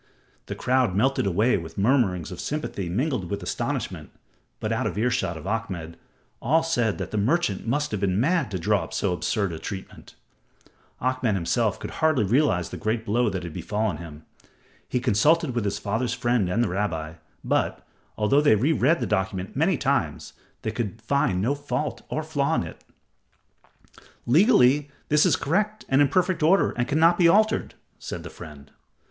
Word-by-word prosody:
The - - -4
crowd 125 -6 +1
melted 130 +1 +2
away 105 +7 +2
with 80 -2 -8
mutterings 100 - +1
of 90 - -8
sympathy 140 - -3
mingled 120 - -1
with 100 -2 -4
astonishment, - - -3 0.5
but - - -3
out - - 0
of - - -4
earshot 115 -7 0
of 80 - -10
Ahmed, 95 -6 -4 0.5
all 160 +7 +2
said 120 -10 0
the 110 - -4
merchant 115 - 0
must 145 +5 0
have 105 - -2
been 95 0 0
mad 165 +1 +1
to 95 - -3
draw 85 - +1
up - - -9
so - - 0
absurd 100 +2 -1
a 80 - -6
testament. 95 +1 -8 0.8
Ahmed 130 -4 0
himself 105 +5 0
could - - -6
hardly 155 -7 +2
realize 105 - +2
the - - -7
great 110 +2 -2
blow 115 +2 +1
that 95 -3 -4
had 85 -2 -7
befallen 105 -3 -2
him. 80 -2 -10 0.6
He 125 - 0
consulted 130 +6 +2
with 120 -3 -1
his 100 - -1
father's 115 +4 -2
friend 120 -6 +1
and 115 +6 +1
the 110 - -1
rabbi, 85 -5 -2 0.3
but, - - -1 0.3
although 110 +7 +3
they 145 -7 +5
re 130 +10 +2
read 155 +4 +2
the - - 0
document 95 -2 -2
many - - +2
times, - - -1 0.3
they 110 - -1
could 110 -1 -4
find 110 -5 0
no 130 +6 +2
fault 145 0 -3
or 155 - -2
flaw 145 -3 0
in - - 0
it. - - -10 1.4
"Legally, 145 - +4 0.2
this 150 0 +4
is - - +4
correct 210 +8 -1
and 135 +2 +3
in 145 - +5
perfect 180 +3 +1
order 175 +6 +4
and 120 0 -2
cannot 165 +4 +3
be 175 - +6
altered," 215 +5 +2 0.2
said - - -6
the - - -8
friend. 75 -2 -12
115 Hz, 175 wpm, -25 LUFS, 95-145 Hz, 1.4 s, be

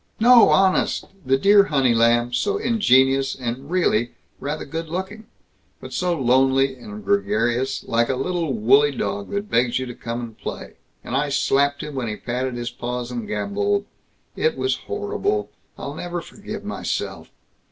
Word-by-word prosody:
"No, 240 +1 +7
honest! 190 -1 +2 0.2
The 135 +1 +2
dear 200 +6 +6
honey 135 -7 +2
lamb, 120 +1 +3
so 405 - 0
ingenious, 135 - +3
and 130 +2 -5
really, 120 -10 +1 0.3
rather 150 +2 -4
good 165 +2 -5
looking. 190 +5 -5 0.5
But - - -10
so 175 -3 0
lonely 135 +1 +3
and 105 -5 -10
gregarious 115 +7 0
like 115 +1 +1
a 135 - +1
little 165 +3 -1
woolly 130 +6 +4
dog 100 -2 -3
that 200 +1 -4
begs 120 +1 +2
you 130 - -2
to 125 - -7
come 120 +1 -5
and 115 -2 -8
play; - - -7 0.3
and - - -4
I 145 +1 +1
slapped 140 +1 +1
him 150 -1 -6
when 130 -3 -3
he 105 - -3
patted 125 +2 -3
his 120 0 -4
paws 120 0 -5
and 120 -3 -5
gamboled 200 - -1 0.5
It 470 +1 0
was 390 - 0
horrible. 420 0 -2 0.3
I'll - - -6
never 175 0 -4
forgive 210 +4 -8
myself. 215 - -4
135 Hz, 165 wpm, -22 LUFS, 120-185 Hz, 0.5 s, No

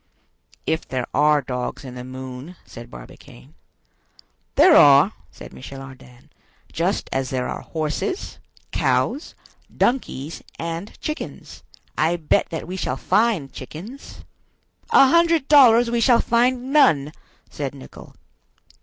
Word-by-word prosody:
"If 160 0 -2
there 130 -2 -3
are 150 -1 +3
dogs 125 +2 -5
in 125 - -8
the 125 0 -8
moon," 130 +5 -9
said 120 0 -11
Barbicane. - - -14 1.0
"There - - +6
are," 145 +8 +7 0.2
said - - -13
Michel 135 +1 -10
Ardan, 130 -2 -14 0.4
"just - - -1
as 130 -1 -2
there 125 -1 -2
are - - -5
horses, 160 - -4 0.3
cows, 290 - -1 0.4
donkeys, 165 - -1 0.2
and 165 +4 -6
chickens. 305 +1 -7 0.4
I 165 +2 +2
bet 160 -3 0
that 165 -1 -6
we 185 +1 -5
shall 130 -7 -3
find 210 -7 0
chickens." 180 - -10 0.7
"A 270 - +6
hundred 335 -2 +3
dollars 240 -5 +6
we 235 -1 0
shall 235 0 +5
find 250 +3 +1
none!" 155 - +4 0.4
said 140 -2 -5
Nicholl. 135 - -13
155 Hz, 125 wpm, -22 LUFS, -, 1.0 s, are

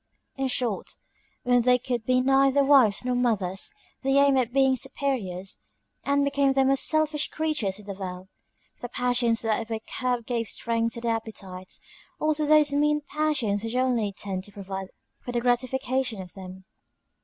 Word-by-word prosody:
In 270 0 -1
short, 245 -5 -2 0.5
when 245 0 +3
they 250 +1 +4
could 245 -2 -3
be 255 0 +3
neither 270 +1 +4
wives 260 -6 +4
nor 250 - 0
mothers, 215 - 0 0.3
they 270 +1 +2
aimed 280 -1 +5
at 245 -2 -1
being 265 0 +3
superiors, 245 -8 -3 0.4
and 280 0 +2
became 280 -1 +2
the 270 0 +3
most 270 +1 +4
selfish 310 -1 +1
creatures 300 -12 -1
in 210 - -12
the 200 - -5
world: 185 -1 -7 0.5
the 245 - -5
passions 245 -2 +1
that 225 0 -1
were 225 - -1 0.2
curbed 250 -3 -1
gave 230 -2 -2
strength 230 +1 -1
to 235 - -6
the 235 - -1
appetites, 200 -5 -5 0.4
or 310 0 +2
to 300 0 -2
those 300 -1 +5
mean 300 +1 +2
passions 265 -10 0
which 225 +1 -4
only 245 -5 +1
tend 195 -1 -4
to 205 - -11
provide 195 -1 -6 0.3
for 245 - -7
the 240 - +1
gratification 255 -1 0
of 180 -2 -9
them. 190 -1 -10
245 Hz, 170 wpm, -26 LUFS, 210-270 Hz, 0.5 s, aimed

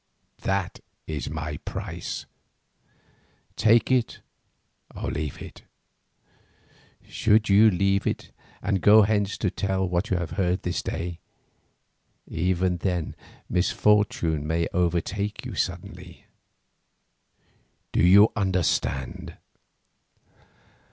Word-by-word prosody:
That 95 -1 -2 0.3
is 75 -3 -4
my 80 -1 -4
price; - - -6 1.3
take 115 +3 +3
it 125 -3 +1 0.8
or - - -4
leave 75 -2 -4
it. - - -10 1.5
Should 110 -1 +2
you 105 +3 +7
leave 100 +1 +1
it - - -3 0.3
and 95 -2 0
go 105 +5 +7
hence 100 -1 0
to 95 - -1
tell 95 -1 -1
what 90 +5 -1
you 95 - +1
have 85 -3 -4
heard 90 +1 0
this 90 - -2
day, 85 0 -4 1.1
even 90 +2 0
then 90 -2 -2 0.3
misfortune 90 -5 +1
may 85 +1 0
overtake 90 +4 -1
you - - -6
suddenly. - - -5 1.7
Do - - +1
you 100 +5 +7
understand?" 90 - -1
95 Hz, 100 wpm, -25 LUFS, 85-100 Hz, 1.7 s, you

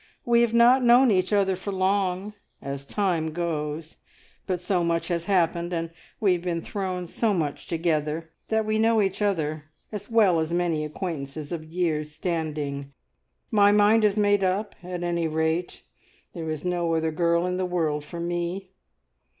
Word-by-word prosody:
We 235 0 +4
have 235 -1 +2
not 245 +3 +6
known 245 +1 +6
each 185 0 +1
other 195 -2 +2
for 190 +2 -5
long, 190 +1 0 0.3
as 140 0 -6
time 170 -5 0
goes, 160 -2 -3 0.5
but 185 -2 -1
so 180 0 0
much 170 +1 0
has 170 -1 -1
happened, 175 -2 +1
and 165 -1 -2 0.3
we 200 -4 +3
have 175 - -2
been 170 -2 -2
thrown 185 -3 -3
so 210 +4 0
much 150 -5 -3
together, 160 -1 -1 0.2
that 220 0 +1
we 215 0 0
know 225 0 +3
each 195 0 0
other 155 -7 -1 0.3
as 205 -1 -6
well 210 -7 +4
as 160 +1 -2
many 170 -3 0
acquaintances 150 -2 -5
of 165 -2 -4
years' 155 -2 -2
standing. 150 -5 -3 0.6
My 205 -1 +5
mind 210 +2 +5
is 210 0 +3
made 205 -1 +3
up, 195 +3 0
at 180 0 -5
any 170 -1 0
rate; 160 +2 -1 0.5
there 165 -3 -5
is 155 +1 -4
no 175 -2 0
other 160 0 0
girl 170 +2 +1
in 180 0 -1
the 185 - 0
world 160 -4 -1
for 170 +3 -8
me! 175 +2 -3
175 Hz, 170 wpm, -25 LUFS, 160-200 Hz, 0.6 s, not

